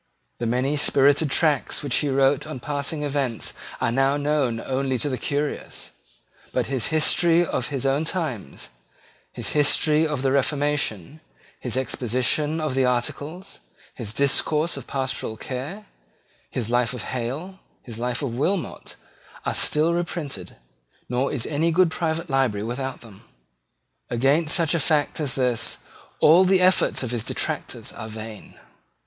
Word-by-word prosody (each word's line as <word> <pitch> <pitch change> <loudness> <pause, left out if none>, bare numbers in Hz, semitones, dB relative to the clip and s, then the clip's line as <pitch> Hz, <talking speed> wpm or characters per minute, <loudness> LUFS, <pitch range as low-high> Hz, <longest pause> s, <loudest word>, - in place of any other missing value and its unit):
The 120 - -1
many 130 +5 +1
spirited 145 +1 +4
tracts 150 0 +1
which 140 -4 +1
he 145 - +1
wrote 135 +1 +2
on 155 -4 -6
passing 145 +3 -3
events 140 -5 -1 0.3
are 115 - +1
now 135 +3 +2
known 145 -5 +1
only 130 +1 -1
to 135 +5 -1
the 130 - -2
curious: 145 +1 -3 0.6
but - - 0
his 130 -4 -1
History 165 +2 +3
of 125 -6 -2
his 135 -3 -3
own 135 +3 +2
Times, 155 - -4 0.6
his - - -5
History 150 +1 +3
of 145 -4 -2
the 135 - +2
Reformation, 140 - 0 0.4
his 125 -1 -3
Exposition 130 +5 0
of 155 -3 -1
the 135 0 +2
Articles, 145 +9 -2 0.3
his 115 -4 -6
Discourse 150 +6 +2
of 140 -3 -8
Pastoral 130 -5 -2
Care, 140 - -6 0.6
his 120 -3 -3
Life 120 0 +2
of 120 - -5
Hale, 135 +10 -4 0.2
his 115 -2 -7
Life 125 +1 -2
of 130 -4 -2
Wilmot, 175 +8 -2 0.5
are - - 0
still 155 +3 +2
reprinted, 155 - -4 0.5
nor 125 +3 0
is 130 -6 -2
any 160 +3 +1
good 175 0 +4
private 165 0 -1
library 130 -8 +1
without 130 +3 -4
them. 110 -5 -14 0.9
Against 140 +6 +2
such 165 -3 +2
a 170 - +2
fact 150 0 +1
as 145 -4 -2
this 125 -3 0 0.4
all 170 +5 +7
the 190 0 +4
efforts 185 -6 +3
of 125 - -3
detractors - - -3
are 110 - -7
vain. 110 -1 -9
140 Hz, 145 wpm, -24 LUFS, 125-155 Hz, 0.9 s, all